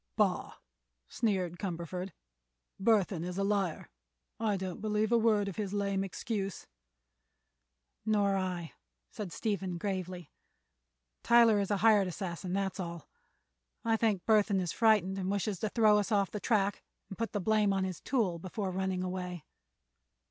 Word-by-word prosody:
"Bah!" - - +1 0.5
sneered 185 -6 -1
Cumberford; 180 0 -4 0.7
"Burthon 195 -5 +2
is 180 +1 -4
a 195 - +1
liar. 195 -5 -1 0.5
I 215 -3 +1
don't 185 -1 -5
believe 215 0 0
a 235 - +5
word 215 -3 +3
of 195 - -5
his 205 -2 -3
lame 200 -1 0
excuse." 195 0 -4 1.4
"Nor 205 -2 +2
I," 180 -3 -3 0.5
added 200 -5 -4
Stephen, 195 -5 -2
gravely. 185 -3 -4 0.9
"Tyler 235 -3 +6
is 200 - -1
a 205 - +2
hired 210 -4 +6
assassin, 180 0 -5
that's 195 0 -1
all. 170 -2 -6 0.8
I 225 -1 +3
think 215 -5 +1
Burthon 210 -3 +4
is 175 -3 -1
frightened, 205 -4 +3
and 185 0 -2
wishes 200 -1 -1
to 215 - -1
throw 215 -2 +5
us 205 +2 -2
off 200 -3 +2
the 210 - -4
track 200 -1 +1 0.3
and 195 - -7
put 230 - -1
the 205 - -1
blame 210 +1 +2
on 195 -1 +1
his 185 -3 -3
tool, 210 -10 0
before 190 +2 -4
running 190 0 -1
away." 180 -3 -4
195 Hz, 150 wpm, -31 LUFS, 185-210 Hz, 1.4 s, Tyler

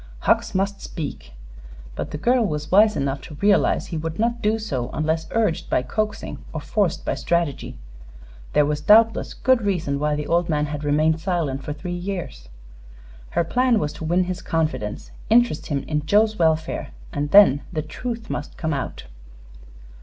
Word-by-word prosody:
Hucks - - +1
must 195 +1 -1
speak; 140 - -7 0.6
but - - -4
the - - -5
girl 240 - +2
was 150 -6 -3
wise 210 +2 +6
enough 140 0 -1
to 150 - -10
realize 200 +5 +3
that - - -13
he 165 - -2
would 160 +1 -4
not 235 +2 0
do 215 +1 +2
so 130 - -3
unless 160 +1 -1
urged 215 -7 0
by 125 - +1
coaxing 215 - -3
or 160 - -3
forced 195 +4 -1
by - - 0
strategy. 170 - -1 0.8
There 150 - +4
was 150 0 -1
doubtless 225 +6 +4
good 260 -1 +3
reason 170 -9 -1
why 150 0 +1
the 150 0 -3
old 170 +1 +1
man 150 -2 +1
had 150 0 -5
remained 155 +2 +2
silent 160 -6 -2
for - - -5
three 165 +4 -6
years. 175 - -5 0.9
Her - - +4
plan 250 +4 +2
was 150 -7 -1
to - - -9
win 175 +3 +2
his 185 0 -4
confidence. 155 -10 -2 0.2
Interest 230 -7 +3
him 140 -3 -2
in 150 -1 -2
Joe's 215 +3 +3
welfare, 160 -1 +1 0.2
and 145 0 -2
then 170 -7 +7
the 155 -3 -2
truth 230 +9 -6
must 145 - -5
come 160 -1 -1
out. 135 - -4
165 Hz, 175 wpm, -23 LUFS, 150-205 Hz, 0.9 s, then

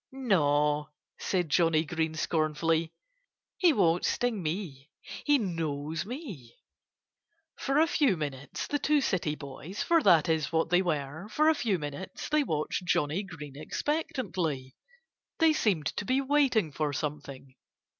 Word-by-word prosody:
"Naw!" 150 - +2 0.3
said 180 -3 0
Johnnie 160 +1 +3
Green 160 -1 -2
scornfully. 160 +1 0 0.7
"He 355 -3 +6
won't 175 - +2
sting 240 -5 0
me. 155 -4 -4 0.4
He 290 -1 +5
knows 165 - -3
me." 210 - -8 1.0
For 275 +1 -1
a 315 - +6
few 285 - +2
minutes 140 -3 -5
the 290 - -1
two 295 +2 +3
city 175 - 0
boys 150 +7 -6
for 335 -1 +3
that 175 - +5
is 160 -2 0
what 165 0 0
they 180 +1 +5
were 155 +1 -3
for 305 +8 +3
a - - +5
few 225 -10 0
minutes 150 +4 -6
they 300 0 +3
watched 155 - -2
Johnnie 165 0 +1
Green 150 -8 -9
expectantly. 170 - -3 0.6
They 325 -2 +5
seemed 195 - +1
to - - -1
be 255 +6 +1
waiting 270 - +2
for 150 +1 -1
something. 140 -2 -5
165 Hz, 140 wpm, -29 LUFS, 150-230 Hz, 1.0 s, He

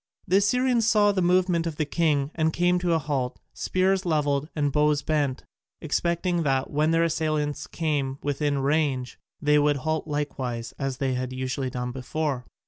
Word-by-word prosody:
The 190 +1 +4
Assyrians 235 +2 +2
saw 210 -2 +4
the 195 -2 0
movement 180 -1 +2
of 160 - -4
the 155 - -1
king 150 -2 +1
and 160 -1 +1
came 175 +2 +2
to 175 -1 +1
a - - +4
halt, 140 -5 -2
spears 190 +1 +1
levelled 150 -3 0
and 145 -2 +1
bows 150 0 +2
bent, 145 -4 0 0.4
expecting 170 +2 0
that, 135 -3 0
when 150 +2 +2
their 165 0 +3
assailants 155 -3 -1
came 145 -5 -2
within 145 0 0
range, 135 -3 0 0.2
they 150 0 +3
would 145 0 +2
halt 155 +3 -2
likewise 130 -6 -3
as 135 -2 -2
they 135 -1 0
had 125 0 -3
usually 130 +1 -2
done 125 0 -4
before. 135 0 -3
150 Hz, 170 wpm, -26 LUFS, 135-170 Hz, 0.4 s, The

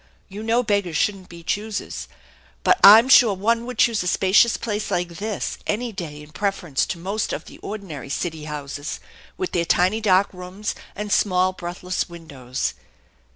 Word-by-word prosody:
You 200 +2 -7
know 230 +2 +1
beggars 200 -7 0
shouldn't 195 0 -1
be 170 -1 -11
choosers, 210 +4 -3 0.6
but 370 - +4
I'm 220 +5 +10
sure 240 -6 +7
one 230 +5 0
would 250 -2 -6
choose 225 -1 +3
a 180 - -3
spacious 195 +6 +4
place 215 -2 -3
like 175 0 -1
this 210 +1 -3
any 235 +3 -1
day 155 -7 -7
in 150 - -15
preference 175 -4 -1
to 175 - -4
most 195 +5 -2
of - - -4
the - - -13
ordinary 180 - -7
city 160 +1 -3
houses, 145 -1 -5 0.4
with 185 - -3
their 170 - +1
tiny 185 +6 +2
dark 195 -2 +4
rooms, 180 +3 -5 0.2
and 210 0 -5
small 185 -2 +2
breathless 180 +1 -4
windows." 140 -7 -5
190 Hz, 165 wpm, -23 LUFS, 170-215 Hz, 0.6 s, I'm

